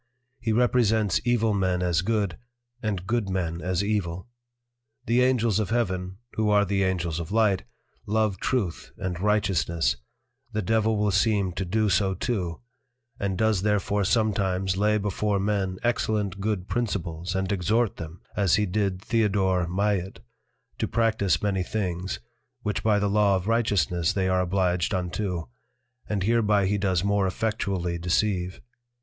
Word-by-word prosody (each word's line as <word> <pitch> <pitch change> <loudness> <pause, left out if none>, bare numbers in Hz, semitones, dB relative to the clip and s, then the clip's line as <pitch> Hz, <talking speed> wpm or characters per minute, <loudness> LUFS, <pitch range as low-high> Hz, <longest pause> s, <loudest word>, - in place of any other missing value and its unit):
He 115 -2 -1
represents 110 -4 +2
evil 115 -3 +2
men 95 -2 +1
as 85 -1 +2
good, 100 -4 -1 0.4
and 100 -5 -2
good 110 -1 0
men 85 -3 -2
as 90 +1 0
evil. 95 -4 -2 0.8
The 120 +2 +3
Angels 120 -5 +2
of 105 - -1
Heaven, 95 -5 -1 0.2
(who 110 -1 0
are 105 0 +4
the 100 0 0
Angels 90 -4 0
of 85 +1 -6
Light) 105 -4 +2 0.4
love 105 -2 +1
Truth 105 -10 -2
and 90 -2 -3
Righteousness, 95 - +1 0.6
the 110 0 -1
Devil 110 +2 +2
will 105 0 +1
seem 100 -1 +2
to 95 +2 -3
do 110 +4 +1
so 95 -1 +2
too; 90 -5 -2 0.6
and 100 -2 -1
does 110 -2 +2
therefore 105 0 +1
sometimes 95 -3 +1
lay 105 +2 +2
before 105 0 0
men 95 -2 -1
excellent 105 -4 0
good 100 -2 -2
Principles 90 -6 -2
and 95 0 -1
exhort 105 +4 +1
them 80 +2 -8
(as 100 -4 +3
he 105 - +2
did 95 -1 -1
Theodore 95 -6 +1
Maillit) 95 +1 -1 0.6
to - - 0
practise 110 -7 +1
many 100 -2 +1
things, 90 -2 -3 0.4
which 105 - -1
by 110 -2 +3
the 100 0 +1
Law 100 -1 +3
of 95 +1 -2
Righteousness 95 - +1
they 95 -2 0
are 95 0 +2
obliged 90 0 +1
unto, 90 0 -2 0.7
and 100 -3 0
hereby 105 -2 +3
he 100 +2 +1
does 95 -3 +1
more 100 -1 +2
effectually 95 -4 -2
deceive. 90 +1 0
100 Hz, 150 wpm, -26 LUFS, 90-105 Hz, 0.8 s, are